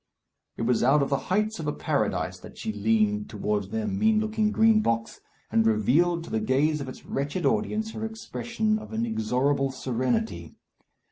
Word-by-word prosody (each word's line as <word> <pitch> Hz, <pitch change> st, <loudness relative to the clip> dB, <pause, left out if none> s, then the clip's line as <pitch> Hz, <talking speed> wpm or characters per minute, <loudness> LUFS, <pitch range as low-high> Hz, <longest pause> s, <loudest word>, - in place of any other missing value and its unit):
It -, -, -2 dB
was 120 Hz, 0 st, +2 dB
out 140 Hz, +4 st, +4 dB
of 140 Hz, -, -3 dB
the 140 Hz, -, +3 dB
heights 210 Hz, +2 st, +1 dB
of 155 Hz, -, -4 dB
a -, -, +1 dB
Paradise -, -, -1 dB
that -, -, -13 dB
she 110 Hz, -, -4 dB
leant 105 Hz, 0 st, +1 dB
towards 105 Hz, -2 st, -2 dB
their 110 Hz, 0 st, -2 dB
mean 215 Hz, +2 st, +2 dB
looking 215 Hz, 0 st, 0 dB
Green 220 Hz, 0 st, +4 dB
Box, 115 Hz, -, -1 dB, 0.3 s
and 115 Hz, -, +4 dB
revealed 140 Hz, -, +2 dB
to -, -, -10 dB
the 110 Hz, -, +1 dB
gaze 140 Hz, +7 st, +1 dB
of 135 Hz, -, -5 dB
its 130 Hz, -, -11 dB
wretched 145 Hz, +6 st, -2 dB
audience 220 Hz, +1 st, 0 dB
her 220 Hz, -, -6 dB
expression 220 Hz, 0 st, -2 dB
of 215 Hz, -, -9 dB
inexorable 145 Hz, -, 0 dB
serenity. 130 Hz, -, -2 dB
145 Hz, 175 wpm, -26 LUFS, -, 0.3 s, out